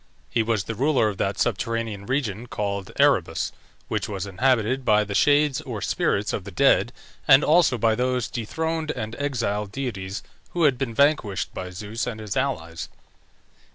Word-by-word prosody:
He 115 - +2
was 110 -3 0
the 115 - -4
ruler 130 -1 +2
of 100 - -7
that 100 +1 0
subterranean 115 -2 -2
region 120 -4 -2
called 100 -3 -3
Erebus, - - +2 0.4
which - - -2
was 100 -2 -3
inhabited 125 +5 +1
by 105 -2 +4
the 100 -1 -5
shades 145 +4 +3
or - - -5
spirits 105 +1 0
of 100 - -2
the 100 - -8
dead, 120 +3 +3 0.4
and 135 -1 +8
also 155 -5 +4
by 115 0 +3
those 125 +1 0
dethroned 160 +7 -3
and 110 -6 -4
exiled 115 -8 -2
deities 105 -6 -4 0.3
who 175 - +1
had 140 -5 +3
been 120 -5 -2
vanquished 140 -9 +2
by 90 - -5
Zeus 105 +6 -4
and 115 -3 -4
his 105 -2 -5
allies. 85 -12 -2
115 Hz, 165 wpm, -24 LUFS, 100-135 Hz, 0.4 s, and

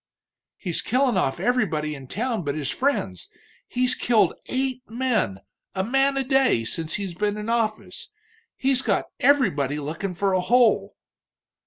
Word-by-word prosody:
"He's 175 -5 -1
killin' 255 -1 +1
off 135 -8 0
everybody 170 -12 0
in 135 -3 -10
town 230 - -2
but 145 -1 -2
his 145 -3 -2
friends 95 - -1 0.4
he's 250 +1 +2
killed 235 -4 +2
eight 260 -1 -1
men, 225 - -1 0.3
a 190 - 0
man 270 +5 +2
a 270 - +2
day, 265 - +2
since 160 +7 0
he's 195 -4 -4
been 205 +3 -1
in 210 +1 -5
office. 225 -2 -2 0.5
He's 265 -1 +2
got - - 0
everybody 150 - +2
lookin' 165 +6 -4
for 195 +2 0
a 185 - +2
hole." 240 +5 +3
215 Hz, 150 wpm, -24 LUFS, 160-255 Hz, 0.5 s, hole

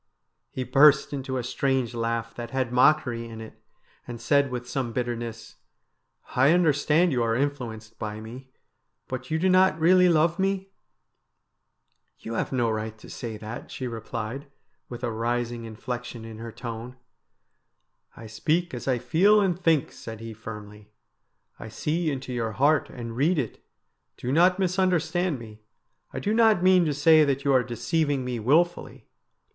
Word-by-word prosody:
He 130 - -4
burst 140 +3 +5
into 130 -1 -3
a 125 - -2
strange 130 -1 -1
laugh 115 0 -2
that 120 -1 -7
had 130 -1 -2
mockery 125 -3 +3
in 110 -1 -9
it, 110 0 -11 0.5
and 120 -1 -7
said 140 +1 +2
with 125 -1 -5
some 125 -2 -3
bitterness: 120 -2 -4 0.3
' - - -48
I 135 +5 +5
understand 160 0 +3
you 125 -3 0
are 115 -1 +1
influenced 115 -5 -4
by 105 0 -5
me, 125 +4 -10 0.6
but 130 0 -6
you 160 - 0
do 180 +4 +1
not 185 -3 +4
really 180 +2 +5
love 165 +1 +2
me? 195 0 -1 0.5
' - - -53
' - - -42
You 115 - -6
have - - -2
no 120 -4 +1
right 110 0 -4
to - - -13
say 115 -3 -6
that,' 110 +3 -8
she 130 - -6
replied, 115 +2 -5 0.4
with 120 0 -8
a 120 - -1
rising 120 +1 -2
inflexion 120 +1 -6
in 110 -1 -9
her 115 0 -7
tone. 120 +1 -7 0.6
' - - -42
I 115 - -10
speak 155 +11 -1
as 120 - -6
I 130 -2 +2
feel 175 - +4
and 190 -4 +2
think,' 160 -4 +2
said 110 -1 -9
he 115 0 -7
firmly. 105 -1 -10 0.4
' - - -44
I - - -8
see 155 +8 -1
into 130 -3 -4
your 115 -2 -2
heart 145 +5 +2
and 115 -2 -7
read 155 +8 +2
it. 125 -7 -4 0.5
Do 125 - -4
not 180 +5 +4
misunderstand 180 -3 +1
me. 110 -2 -12 0.5
I - - -7
do 210 - -1
not 220 -5 +4
mean 185 -2 +5
to 150 - 0
say 155 +2 +6
that 140 -1 -1
you 140 - +3
are 130 - +5
deceiving 135 +3 -1
me 125 -2 -3
wilfully. 165 +10 0
130 Hz, 175 wpm, -26 LUFS, 115-155 Hz, 0.6 s, say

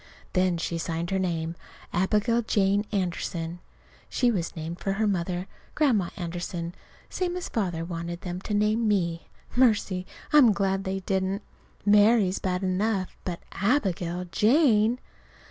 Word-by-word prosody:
Then 185 -2 +2
she 165 0 -2
signed 165 +1 -3
her 190 - +1
name, 165 -3 -1 0.4
Abigail 210 +6 +2
Jane 205 -2 +2
Anderson. 175 -3 -2 0.5
(She 245 -2 +2
was 175 -6 -2
named 165 +1 -5
for 195 - -1
her 215 +2 0
mother, 180 -2 -1 0.3
Grandma 235 - +2
Anderson, 175 -1 -4 0.3
same 360 -1 -2
as 360 - -5
Father 175 -7 -1
wanted 170 0 -5
them 180 0 -5
to 210 - -2
name 215 +2 +2
me. 170 -5 0 0.3
Mercy! 210 -7 +2 0.3
I'm 260 -8 +7
glad 195 0 0
they 190 0 -2
didn't. 190 +2 -1 0.4
"Mary" 210 0 +6
is 185 - -3
bad 185 0 -1
enough, 190 +1 0
but 175 -2 -4
"Abigail 185 -6 0
Jane" 230 - +4
190 Hz, 140 wpm, -27 LUFS, 175-210 Hz, 0.5 s, I'm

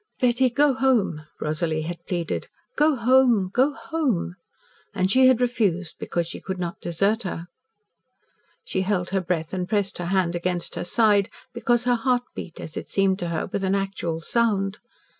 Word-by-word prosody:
"Betty, 250 +1 +3
go 280 +3 +3
home," 240 -13 +1
Rosalie 155 0 -1
had 170 +1 -6
pleaded. 175 -2 -2 0.3
"Go 300 0 +4
home 240 -5 +4
go 265 +4 +3
home." 275 - -2 0.6
And 190 -1 +1
she 260 +3 +6
had 255 -2 +5
refused, 205 -8 0
because 170 -1 -1
she 165 - -8
could 190 -1 -4
not 175 -1 -4
desert 200 +7 +1
her. 175 -5 -4 1.2
She 190 - -1
held 185 -2 -1
her 195 -1 +1
breath 170 -2 -2
and 180 -1 -2
pressed 200 -3 0
her 175 - -3
hand 180 -2 +1
against 175 0 -2
her - - -3
side, 205 0 +3 0.2
because 240 0 +1
her 245 0 +3
heart 245 +1 +1
beat, 170 - -8
as 155 - -8
it - - -6
seemed 195 -1 +2
to 175 - -3
her, 165 -2 -2
with 195 - -1
an 190 +1 +2
actual 190 -4 -2
sound. 205 0 0
195 Hz, 175 wpm, -24 LUFS, 175-240 Hz, 1.2 s, she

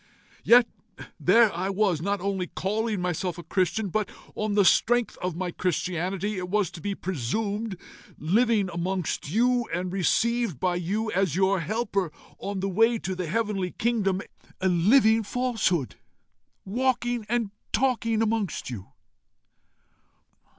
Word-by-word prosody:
Yet 240 0 +7 0.5
there 230 -2 +5
I 180 +3 -2
was, 195 -5 +1
not 200 +1 -1
only 190 -2 -1
calling 215 +3 -2
myself 180 0 -2
a 175 - -8
Christian, 190 +4 0
but 210 +2 -1 0.2
on 215 -1 -2
the 205 -2 +4
strength 240 +5 +3
of 180 -2 -2
my 180 0 -3
Christianity, 185 +3 -2
it 180 0 -5
was 205 -3 +1
to 165 - -10
be 200 +2 -2
presumed, 200 - -3 0.4
living 210 +5 +2
amongst 175 -3 -2
you, 240 +5 +2
and 180 +2 -2
received 225 - +1
by 180 +1 +1
you, 210 +6 -2
as 190 -4 +1
your 190 +1 +2
helper 200 -2 -1 0.3
on 200 -1 -4
the 195 - 0
way 225 +5 +3
to 190 -3 -4
the 180 -2 -4
heavenly 205 -1 -1
kingdom 200 -5 0 0.4
a 190 - +1
living 220 +6 +4
falsehood, 215 - -1 0.7
walking 240 +2 0
and 235 -4 0 0.2
talking 230 -2 +1
amongst 215 -11 -2
you!" 100 -5 -7
200 Hz, 135 wpm, -26 LUFS, 180-225 Hz, 0.7 s, Yet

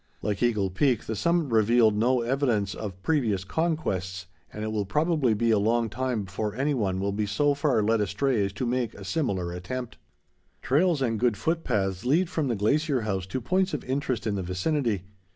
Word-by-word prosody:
Like 105 -1 -2
Eagle 105 -6 +1
Peak, 125 +4 +1
the 110 - -3
summit 170 - +1
revealed 110 0 +4
no 120 +3 +2
evidence 120 -5 0
of 95 -3 -7
previous 115 - +1
conquests, 95 - -2 0.3
and 105 - -6
it 110 - -2
will 105 -1 0
probably 150 - +1
be 115 +2 +1
a 110 - +4
long 115 +2 +1
time 125 -4 -1
before 100 +3 -4
any 140 +4 0
one 95 -7 -1
will 100 +1 -1
be 105 +1 -1
so 145 +8 +2
far 140 -6 +1
led 110 +1 +2
astray 105 +3 +1
as 100 - -1
to 100 - -3
make 120 -2 -1
a 100 - -10
similar 95 - -1
attempt. 120 +8 -5 0.7
Trails 155 +1 +2
and 115 -3 0
good 120 -3 +2
foot 165 0 -1
paths 95 -5 -1
lead 165 +8 +2
from 160 -5 0
the 120 - 0
Glacier 140 +6 +1
House 95 -4 -2
to 130 - -3
points 185 +6 0
of 145 - -5
interest 130 -2 -2
in 110 - 0
the 100 - -2
vicinity. 100 - -1
115 Hz, 200 wpm, -27 LUFS, 100-140 Hz, 0.7 s, revealed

